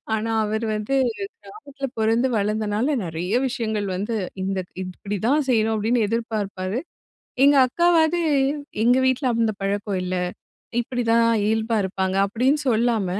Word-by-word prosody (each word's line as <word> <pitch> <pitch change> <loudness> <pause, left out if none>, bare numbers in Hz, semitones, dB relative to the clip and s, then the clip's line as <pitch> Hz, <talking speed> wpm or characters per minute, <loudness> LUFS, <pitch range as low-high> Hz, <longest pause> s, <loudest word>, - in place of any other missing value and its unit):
ஆனா, 225 +1 -2
அவர் 220 +2 -2
வந்து 215 +6 -2 0.5
கிராமத்துல 280 -10 -7
பிறந்து 225 +4 +2
வளர்ந்தனால, 210 +3 0 0.2
நெறைய 170 +4 -3
விஷயங்கள் 220 -5 -2
வந்து 210 +5 -2 0.3
இந்த 195 0 -2 0.3
இப்படி 195 +3 -5
தான் 290 +2 +2
செய்யணும் 225 -2 +2
அப்படின்னு 220 +1 +1
எதிர்பார்ப்பாரு. 215 -3 -2 0.6
எங்க 285 +1 +6
அக்காவாது 340 +3 +3 0.6
"எங்க 245 +2 +5
வீட்டுல 260 +1 +1
அந்த 225 -1 +2
பழக்கம் 200 0 -1
இல்ல, 185 0 -2 0.6
இப்படித்தான் 235 -1 +1 0.2
இயல்பா 220 +1 +1
இருப்பாங்க, 190 0 -1
அப்டின்னு 255 +8 +1
சொல்லாம, 230 -3 +2
225 Hz, 125 wpm, -23 LUFS, 205-245 Hz, 0.6 s, எங்க